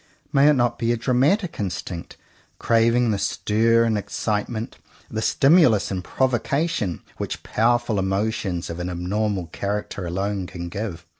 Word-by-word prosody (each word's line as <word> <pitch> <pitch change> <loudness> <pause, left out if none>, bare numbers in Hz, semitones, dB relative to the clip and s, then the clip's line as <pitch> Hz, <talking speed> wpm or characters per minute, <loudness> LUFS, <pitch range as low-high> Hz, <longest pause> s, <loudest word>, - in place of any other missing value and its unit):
May 140 +1 +5
it - - +6
not 120 -3 +1
be 115 0 +1
a 120 - +1
dramatic 140 - +1
instinct, 90 -3 -5 0.4
craving 115 +1 +3
the 100 - -1
stir 115 +3 +2
and 110 -2 +1
excitement, 110 +2 -3 0.3
the 110 - -2
stimulus 135 - +4
and 90 -2 -3
provocation, 130 - -1
which - - -5
powerful 120 -1 +1
emotions 95 -2 -1
of 85 - -6
an 90 +1 -3
abnormal 95 +2 -1
character 100 -2 -3
alone 95 +2 -2
can 85 -1 -6
give 90 -3 -5
110 Hz, 140 wpm, -23 LUFS, 95-120 Hz, 0.4 s, it